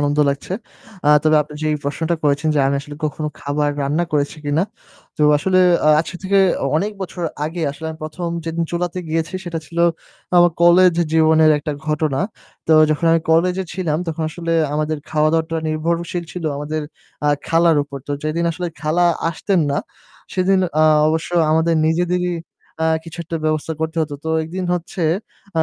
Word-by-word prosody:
আনন্দ 145 0 0
লাগছে। 140 +5 -3 0.5
আ - - +5
তবে 155 0 +4
আপনি 150 0 -13
যেই 155 -1 +1
প্রশ্নটা 160 +4 -1
করেছেন 145 +1 +1
যে - - +2
আমি 140 - +1
আসলে 145 +1 -10
কখনো 150 0 -2
খাবার 145 +1 0
রান্না 150 +5 0
করেছি 145 0 0
কিনা? 145 +3 +1 0.5
তো - - 0 0.2
আসলে 185 +4 +2 0.3
আ - - +6
আজকে 170 +2 -6
থেকে 195 +1 +2 0.2
অ - - 0
অনেক 205 +6 -1
বছর 180 -1 -5 0.2
আগে 165 +3 -4
আসলে 155 +3 -7
আমি 160 - -9
১ম 170 +3 -4 0.2
যেদিন 165 0 -2
চুলাতে 175 +1 -2
গিয়েছি 165 +2 -2
সেটা 170 -2 -3
ছিল 170 +3 -7 0.6
আমার 175 0 +6
কলেজ 175 +1 +6 0.2
জীবনের 160 -1 +5
একটা 150 +1 -4
ঘটনা। 150 -2 0 0.5
তো 160 - +3 0.2
যখন 160 +2 0
আমি 165 - +3
কলেজে 180 +3 +2
ছিলাম 165 -4 -1
তখন 165 0 -3
আসলে 165 0 -3 0.2
আমাদের 155 +1 -1
খাওয়া-দাওয়াটা 160 +1 +1
নির্ভরশীল 170 +2 -2
ছিল 180 -2 -6
আমাদের 150 +2 -3 0.4
আ - - +4 0.2
খালার 165 -1 +4
উপর। 140 -1 -8
তো 145 - -1
যেদিন 155 +3 -1
আসলে 175 +2 -4
খালা 160 +3 +1 0.3
আসতেন 185 +2 0
না 140 - 0 0.6
সেদিন 190 +1 +3 0.2
আ 155 - +6 0.2
অবশ্য 160 +2 -1 0.2
আমাদের 160 +1 +2
নিজেদেরই 180 +1 0 0.5
আ - - +3 0.2
কিছু 165 +1 -10
একটা 165 +1 -4
ব্যবস্থা 155 0 0
করতে 160 +1 -2
হতো। 145 -2 -4
তো 160 - -2
একদিন 180 +4 -5
হচ্ছে, 175 +1 -4 0.6
আ - - +5
160 Hz, 175 wpm, -19 LUFS, 155-175 Hz, 0.6 s, আ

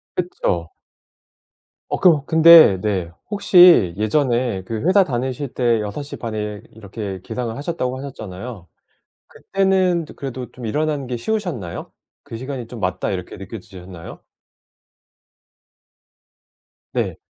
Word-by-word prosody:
그쵸. 90 - -2 1.2
어 - - -3
그럼 160 -6 +5
근데 160 - +7
네 95 -5 -1 0.2
혹시 180 - +6
예전에 120 -2 0
그 110 +2 -4
회사 190 +2 +5
다니실 130 0 -3
때 120 -3 +2
6:30 110 +1 -5
에 105 0 -4
이렇게 100 -3 -7
기상을 120 -3 -4
하셨다고 135 -3 -3
하셨잖아요. 110 -6 -8 0.6
그때는 190 -3 0
그래도 130 -3 -6
좀 125 - -10
일어나는 145 +3 -1
게 125 -1 -4
쉬우셨나요? 150 - -4 0.3
그 115 - -8
시간이 130 -1 -6
좀 115 0 -9
'맞다.' 90 -1 -2
이렇게 90 -2 -5
느껴지셨나요? 90 -4 -10 2.7
네. - - -2
120 Hz, 245 characters per minute, -20 LUFS, 105-150 Hz, 2.7 s, 근데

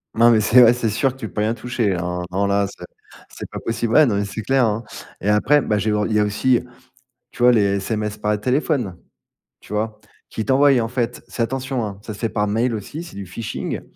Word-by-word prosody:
Non 115 +1 +6
mais 110 - +4
c'est 120 +4 +6
ouais, 115 - +7
c'est 120 -2 -1
sûr 130 +6 +1
que 130 - -18
tu - - -4
peux 105 - -4
rien 110 +2 +1
toucher 120 -3 -2
là, 90 -3 -1
hein, 90 0 -3
non, 100 +2 0
là, 100 0 +1
c'est 90 - -11 0.4
c'est - - -9
pas - - -5
possible. 115 0 -2
Ouais, 155 - +7
non 110 - 0
mais 100 - 0
c'est 110 +2 -6
clair, 135 +3 +2
hein 110 +1 -1 0.4
et 100 - -5
après, 130 +8 +4
bah, 105 -4 0
j'ai 105 +1 0
re 105 0 +1
il 110 - -2
y 105 - +3
a - - +4
aussi, 115 +4 +1 0.7
tu 120 - -7
vois, 125 - +7
les 100 -3 +2
SMS 105 +1 -3
par 105 0 0
téléphone, 125 - 0 0.6
tu 105 - -9
vois? 110 0 -2 0.3
Qu'ils 110 - -4
t'envoient 140 +1 +5
en 115 - -1
fait, 120 -1 -3
ça 115 - -3
attention, 130 0 -2
hein, 100 -2 -6
ça 110 - -7
se - - -12
fait 115 0 -2
par 105 -1 0
mail 115 +3 0
aussi, 145 - -6
c'est 175 - -11
du 100 -2 -6
phishing. 110 +5 -5
110 Hz, 250 wpm, -21 LUFS, 105-125 Hz, 0.7 s, ouais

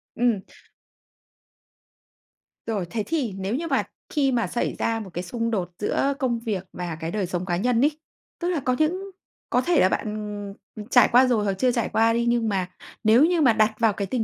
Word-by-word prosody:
Ừm. 235 -5 +1 2.3
Rồi, 205 -5 -1
thế 220 -3 -2
thì, 280 -11 -1
nếu 195 +5 -2
như 330 +3 -3
mà - - +1 0.3
khi 275 -3 +1
mà 235 -2 +1
xảy 240 - -2
ra 225 0 0
một 200 -3 -8
cái 175 - -3
xung 230 +5 -3
đột 180 -4 -2
giữa 275 +6 +1
công 240 -3 0
việc 210 -5 -3
và 175 -3 -4
cái 165 +1 -4
đời 205 -3 -1
sống 180 0 -3
cá 175 -2 -1
nhân 240 +3 +1
ấy, 295 +2 +4 0.5
tức 350 0 -1
là 340 -5 0
có 255 -1 0
những 370 +5 0 0.4
có 250 - +2
thể 345 0 +2
là 185 - +5
bạn, - - -1
ừm, 210 -1 -5 0.2
ừm, 210 -1 -7
trải 245 -3 +5
qua 250 +2 +7
rồi 225 -4 +2
hoặc 200 -1 0
chưa 250 +6 +1
trải 235 -1 -1
qua 225 +1 +3
đi, 235 0 0
nhưng 235 -2 +2
mà 185 -2 -1 0.3
nếu 230 +7 +6
như 345 -2 +2
mà 245 -5 +5
đặt 215 0 +3
vào 225 -3 +3
cái 200 -1 -3
tình 235 +1 -1
230 Hz, 220 wpm, -24 LUFS, 200-255 Hz, 2.3 s, qua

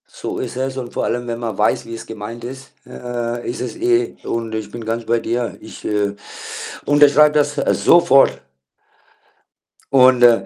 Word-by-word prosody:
So - - -6
ist 125 - -5
es 130 0 -3
und 125 -2 -6
vor - - -1
allem, 120 +1 -2
wenn 115 0 -4
man 115 -4 -4
weiß, 105 - +1
wie 115 - -7
es 115 - -9
gemeint 110 +2 -8
ist 130 +2 -9 0.2
äh, 120 -1 -4
ist 120 - -4
es - - -4
eh 360 +2 +1
und 115 -1 -3
ich 110 -2 -4
bin 120 +1 -7
ganz 115 +1 -3
bei 115 +1 +1
dir. 120 +1 -3
Ich, - - -12
äh, 105 -1 0 0.7
unterschreibe 145 +1 +5
das 145 0 +2 0.3
sofort. 135 -6 +5 1.5
Und, 130 -2 +6
äh, 115 -5 +6
120 Hz, 170 wpm, -19 LUFS, 115-135 Hz, 1.5 s, Und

